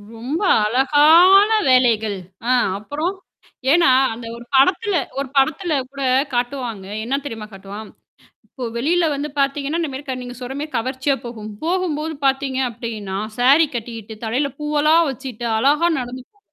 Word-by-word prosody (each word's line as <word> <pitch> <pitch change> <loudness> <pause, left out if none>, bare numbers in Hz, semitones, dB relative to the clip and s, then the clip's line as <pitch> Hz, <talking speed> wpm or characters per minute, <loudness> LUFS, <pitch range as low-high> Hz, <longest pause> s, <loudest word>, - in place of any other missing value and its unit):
ரொம்ப 260 - -4 0.2
அழகான 310 - +6 0.2
வேலைகள். 225 -5 +3 0.3
அ - - 0 0.3
அப்புறம் 305 - -3 0.6
ஏன்னா 335 -3 +5 0.2
அந்த 230 +1 -9
ஒரு 235 0 -11
படத்துல 370 +8 +3 0.2
ஒரு 275 - -2
படத்துல 315 +5 +1 0.2
கூட 275 -1 -5 0.3
காட்டுவாங்க. 245 -5 -3 0.2
என்ன 265 - -1
தெரியுமா 225 -5 -6
காட்டுவான்? 200 +3 -9 0.6
இப்போ 250 -3 -7
வெளியில 330 +8 +1
வந்து 290 +2 -3
பாத்தீங்கன்னா, 280 +3 0
இந்த 320 - -1
மாரி 265 +2 -7
க 265 - -3
நீங்க 245 0 -8
சொல்ற 250 +1 -6
மாரி 300 +1 -5
கவர்ச்சியா 260 +4 -1
போகும். 220 -3 -7
போகும்போது 325 -3 -1
பாத்தீங்க 270 -1 0
அப்டின்னா, 220 -5 -6 0.2
சாரி 275 +6 +5
கட்டிக்கிட்டு 225 -2 -6
தலையில 265 +6 -1
பூவெலாம் 300 +2 +3
வச்சுட்டு 255 -3 -6
அழகா 295 +7 +3
நடந்து 250 0 -6
போ. 410 - -34
270 Hz, 140 wpm, -20 LUFS, 235-305 Hz, 0.6 s, அழகான